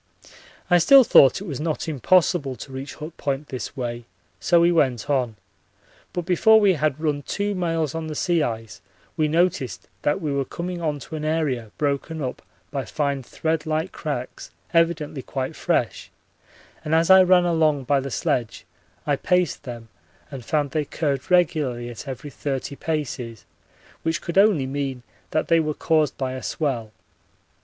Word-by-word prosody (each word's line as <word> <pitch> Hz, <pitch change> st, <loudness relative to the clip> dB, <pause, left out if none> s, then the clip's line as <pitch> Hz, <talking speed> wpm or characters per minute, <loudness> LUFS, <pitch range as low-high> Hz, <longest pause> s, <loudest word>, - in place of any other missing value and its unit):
I 175 Hz, -1 st, +5 dB
still 270 Hz, +11 st, +8 dB
thought 140 Hz, -, +6 dB
it -, -, -6 dB
was 145 Hz, -9 st, -5 dB
not 155 Hz, +1 st, -2 dB
impossible 155 Hz, -, +2 dB
to 135 Hz, -, -10 dB
reach 135 Hz, +2 st, -7 dB
Hut 155 Hz, +2 st, -8 dB
Point 140 Hz, +1 st, -3 dB
this 130 Hz, +2 st, -6 dB
way, 120 Hz, -2 st, -4 dB, 0.3 s
so 175 Hz, -2 st, +4 dB
we 170 Hz, +1 st, +5 dB
went 135 Hz, -9 st, +1 dB
on, 125 Hz, -5 st, 0 dB, 0.8 s
but 175 Hz, -2 st, -4 dB
before 220 Hz, +5 st, +5 dB
we 200 Hz, -3 st, +4 dB
had 155 Hz, -3 st, 0 dB
run 150 Hz, -2 st, -1 dB
two 205 Hz, +7 st, -2 dB
miles 165 Hz, -5 st, -1 dB
on 165 Hz, -1 st, -4 dB
the 155 Hz, -, -5 dB
sea 170 Hz, +1 st, +1 dB
ice 115 Hz, -7 st, -4 dB, 0.3 s
we 155 Hz, -1 st, +2 dB
noticed 155 Hz, -, 0 dB
that 145 Hz, -, +1 dB
we 150 Hz, -3 st, -2 dB
were 140 Hz, 0 st, 0 dB
coming 175 Hz, +5 st, -5 dB
on 155 Hz, -3 st, -1 dB
to 160 Hz, -, -8 dB
an 155 Hz, -, -5 dB
area 150 Hz, -8 st, -1 dB
broken 145 Hz, +2 st, -1 dB
up 130 Hz, -4 st, -4 dB, 0.3 s
by 140 Hz, -2 st, -2 dB
fine 140 Hz, +3 st, -2 dB
thread 160 Hz, +5 st, -2 dB
like 155 Hz, +3 st, -1 dB
cracks 145 Hz, -6 st, -5 dB, 0.2 s
evidently 165 Hz, -4 st, +1 dB
quite 130 Hz, 0 st, -4 dB
fresh, -, -, -1 dB, 0.7 s
and 155 Hz, +1 st, +1 dB
as 165 Hz, +3 st, +4 dB
I 190 Hz, 0 st, +9 dB
ran 180 Hz, -1 st, +5 dB
along 155 Hz, -5 st, +2 dB
by 140 Hz, +2 st, +2 dB
the 135 Hz, +1 st, -4 dB
sledge 120 Hz, -2 st, -2 dB, 0.4 s
I 145 Hz, -, +2 dB
paced 180 Hz, +2 st, 0 dB
them 120 Hz, -3 st, -8 dB, 0.4 s
and 135 Hz, -3 st, -7 dB
found 145 Hz, 0 st, 0 dB
they 155 Hz, +1 st, 0 dB
curved 140 Hz, -3 st, -2 dB
regularly 145 Hz, -9 st, +1 dB
at 120 Hz, -, -9 dB
every 135 Hz, +2 st, -6 dB
30 140 Hz, +1 st, -4 dB
paces, 130 Hz, -8 st, -4 dB, 0.6 s
which 165 Hz, 0 st, -1 dB
could 170 Hz, +2 st, 0 dB
only 195 Hz, -9 st, +4 dB
mean 135 Hz, -2 st, -3 dB, 0.3 s
that 155 Hz, -, 0 dB
they 165 Hz, -1 st, +4 dB
were 155 Hz, -2 st, -1 dB
caused 155 Hz, -3 st, +1 dB
by 130 Hz, -1 st, -2 dB
a 130 Hz, -, -6 dB
swell. 125 Hz, -8 st, -2 dB
150 Hz, 170 wpm, -23 LUFS, 130-165 Hz, 0.8 s, I